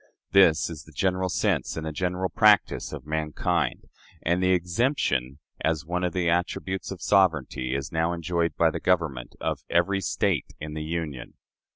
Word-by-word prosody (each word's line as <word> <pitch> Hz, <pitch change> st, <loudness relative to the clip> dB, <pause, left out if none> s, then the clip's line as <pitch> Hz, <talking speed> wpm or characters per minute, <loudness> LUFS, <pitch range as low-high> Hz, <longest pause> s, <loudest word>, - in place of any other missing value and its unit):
This 85 Hz, -5 st, +5 dB
is 75 Hz, -4 st, -8 dB
the 80 Hz, -, -15 dB
general 95 Hz, +3 st, 0 dB
sense -, -, 0 dB
and 80 Hz, -, -4 dB
the 80 Hz, -, -3 dB
general 90 Hz, +3 st, -1 dB
practice 105 Hz, -3 st, +3 dB
of -, -, -7 dB
mankind; 75 Hz, -1 st, -1 dB, 0.4 s
and 85 Hz, +2 st, +1 dB
the 95 Hz, -, +2 dB
exemption, 90 Hz, -, +1 dB, 0.3 s
as 80 Hz, -2 st, 0 dB
one 90 Hz, +2 st, -2 dB
of 90 Hz, -, 0 dB
the 90 Hz, 0 st, -1 dB
attributes 90 Hz, +2 st, -1 dB
of 95 Hz, -3 st, -7 dB
sovereignty, 80 Hz, -9 st, +2 dB
is 70 Hz, 0 st, -4 dB
now 80 Hz, +1 st, +1 dB
enjoyed 85 Hz, 0 st, -1 dB
by 80 Hz, -1 st, +4 dB
the -, -, -4 dB
government 80 Hz, -9 st, 0 dB
of -, -, -2 dB
every 95 Hz, +3 st, +2 dB
State 90 Hz, -, -1 dB
in 75 Hz, 0 st, -6 dB
the 80 Hz, -, -4 dB
Union. 75 Hz, -4 st, -4 dB
85 Hz, 170 wpm, -26 LUFS, 80-90 Hz, 0.4 s, This